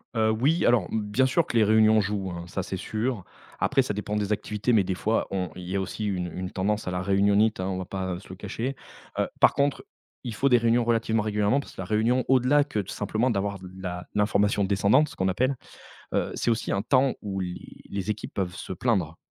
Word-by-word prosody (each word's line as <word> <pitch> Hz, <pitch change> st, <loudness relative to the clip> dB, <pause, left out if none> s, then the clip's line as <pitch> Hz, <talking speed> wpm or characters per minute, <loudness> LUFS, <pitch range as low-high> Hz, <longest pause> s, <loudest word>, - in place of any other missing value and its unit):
Heu, 110 Hz, -1 st, +3 dB
oui, 135 Hz, +10 st, +2 dB
alors, 120 Hz, -7 st, +3 dB
m 110 Hz, -, 0 dB
bien 105 Hz, +5 st, +1 dB
sûr 140 Hz, +5 st, +2 dB
que 120 Hz, -, -1 dB
les 110 Hz, -, +6 dB
réunions 110 Hz, +1 st, +5 dB
jouent, 100 Hz, -2 st, -2 dB
hein, 85 Hz, -1 st, -6 dB
ça, 95 Hz, +1 st, -3 dB
c'est 95 Hz, +1 st, -4 dB
sûr. 110 Hz, +2 st, -2 dB, 0.4 s
Après, -, -, +3 dB
ça -, -, -2 dB
dépend 105 Hz, +1 st, -3 dB
des 105 Hz, -1 st, -1 dB
activités, 105 Hz, +2 st, -1 dB
mais 110 Hz, -4 st, +4 dB
des 95 Hz, -, -2 dB
fois, 110 Hz, +5 st, 0 dB
on 95 Hz, -2 st, -2 dB
il 90 Hz, -, -8 dB
y 95 Hz, -, -3 dB
a 100 Hz, -, +1 dB
aussi 105 Hz, +3 st, -4 dB
une 90 Hz, -4 st, -2 dB
une 90 Hz, 0 st, -4 dB
tendance 105 Hz, +1 st, -1 dB
à -, -, -1 dB
la 90 Hz, 0 st, -2 dB
réunionnite, 100 Hz, +3 st, +3 dB
hein, 95 Hz, -, -1 dB
on 95 Hz, -, -2 dB
va 95 Hz, -, -4 dB
pas 95 Hz, -1 st, -4 dB
se 95 Hz, -, -16 dB
le 95 Hz, -, -7 dB
cacher, 115 Hz, +7 st, -4 dB, 0.4 s
heu, -, -, +2 dB
par -, -, +6 dB
contre, 140 Hz, 0 st, 0 dB, 0.4 s
il 120 Hz, -, -3 dB
faut 135 Hz, -, +2 dB
des 125 Hz, -, +6 dB
réunions 115 Hz, +1 st, +3 dB
relativement 115 Hz, -2 st, +1 dB
régulièrement. 105 Hz, +4 st, +1 dB
Parce 140 Hz, -, -9 dB
que -, -, -6 dB
la -, -, -5 dB
réunion 115 Hz, +6 st, +2 dB
au-delà 130 Hz, +3 st, +4 dB
que 140 Hz, -7 st, -3 dB
de 100 Hz, -, -4 dB
simplement 110 Hz, +5 st, -1 dB
d'avoir 100 Hz, -1 st, -2 dB
de 90 Hz, 0 st, -10 dB
la 90 Hz, -1 st, -5 dB
l'information 105 Hz, 0 st, +2 dB
descendante 100 Hz, +9 st, +3 dB
ce -, -, -12 dB
qu'on 95 Hz, -, 0 dB
appelle, 130 Hz, +8 st, 0 dB, 0.6 s
heu, -, -, +1 dB
c'est -, -, 0 dB
aussi 115 Hz, -1 st, -1 dB
un 100 Hz, -, 0 dB
temps 130 Hz, +3 st, +3 dB
où 95 Hz, -2 st, -3 dB
les 90 Hz, -1 st, -4 dB, 0.3 s
les 100 Hz, +1 st, -3 dB
équipes 105 Hz, -, -4 dB
peuvent 90 Hz, -3 st, -2 dB
se 95 Hz, -, -6 dB
plaindre. 90 Hz, -5 st, 0 dB
105 Hz, 240 wpm, -26 LUFS, 95-115 Hz, 0.6 s, les